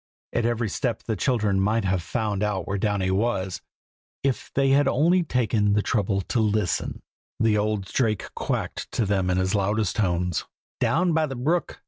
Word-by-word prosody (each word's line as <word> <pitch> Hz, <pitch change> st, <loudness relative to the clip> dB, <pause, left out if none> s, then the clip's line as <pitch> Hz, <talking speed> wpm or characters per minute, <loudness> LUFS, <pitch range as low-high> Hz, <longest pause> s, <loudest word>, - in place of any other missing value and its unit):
at 120 Hz, -1 st, +1 dB
every 120 Hz, -1 st, 0 dB
step 115 Hz, +3 st, -2 dB
the 110 Hz, -, -2 dB
children 105 Hz, -3 st, +1 dB
might 105 Hz, +2 st, +1 dB
have 95 Hz, -1 st, +1 dB
found 105 Hz, +3 st, -2 dB
out 105 Hz, -4 st, -1 dB
where 100 Hz, 0 st, -1 dB
Downy 100 Hz, -2 st, 0 dB
was, 95 Hz, -2 st, -1 dB, 0.6 s
if 135 Hz, -2 st, -1 dB
they 135 Hz, 0 st, +3 dB
had 140 Hz, +1 st, +4 dB
only 170 Hz, +8 st, +3 dB
taken 110 Hz, -9 st, +1 dB
the 105 Hz, 0 st, +2 dB
trouble 100 Hz, -3 st, 0 dB
to 115 Hz, +5 st, -1 dB
listen. 105 Hz, -4 st, 0 dB, 0.4 s
The 110 Hz, -2 st, +3 dB
old 105 Hz, -2 st, -1 dB
Drake 110 Hz, -1 st, -1 dB
quacked -, -, -3 dB
to 115 Hz, -, +1 dB
them 95 Hz, -2 st, +1 dB
in 90 Hz, -, +1 dB
his 95 Hz, 0 st, +1 dB
loudest 105 Hz, 0 st, 0 dB
tones: 90 Hz, -4 st, 0 dB, 0.4 s
"down 175 Hz, +1 st, +2 dB
by 155 Hz, -1 st, +2 dB
the 135 Hz, -, -5 dB
brook! 155 Hz, +8 st, -1 dB
105 Hz, 175 wpm, -25 LUFS, 95-120 Hz, 0.6 s, had